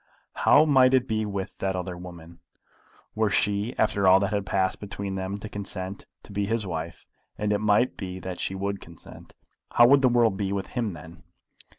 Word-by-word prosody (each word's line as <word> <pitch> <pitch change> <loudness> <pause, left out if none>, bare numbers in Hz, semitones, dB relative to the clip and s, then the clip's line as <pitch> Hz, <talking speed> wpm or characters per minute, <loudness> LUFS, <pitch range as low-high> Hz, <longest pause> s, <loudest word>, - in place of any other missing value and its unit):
But - - -7
how 155 - +6
might 130 -3 +5
it 130 0 +1
be 110 -1 -1
with 100 -2 -5
that 95 -1 -1
other 90 0 -4
woman? 85 -2 -11 0.7
Were 110 -1 +1
she, 105 +4 0
after 100 -3 +2
all 95 +1 +7
that 100 +2 -1
had 100 -2 -2
passed 95 0 0
between 100 -1 -5
them, 95 +1 -3
to 110 - -7
consent 100 -2 -6 0.2
to - - -14
be 100 0 -2
his 115 0 -1
wife, 85 -2 -6 0.3
and 105 0 0
it 105 - 0
might 105 +4 +2
be 95 -2 -6
that 90 0 -6
she 95 - -3
would 100 +1 -3
consent, 85 0 -14 0.4
how 120 - +7
would 135 +3 +6
the 130 - +4
world 115 -5 +3
be 100 -1 -2
with 100 -1 -3
him 115 -6 -2
then? 85 +1 -12
100 Hz, 205 wpm, -26 LUFS, 95-110 Hz, 0.7 s, all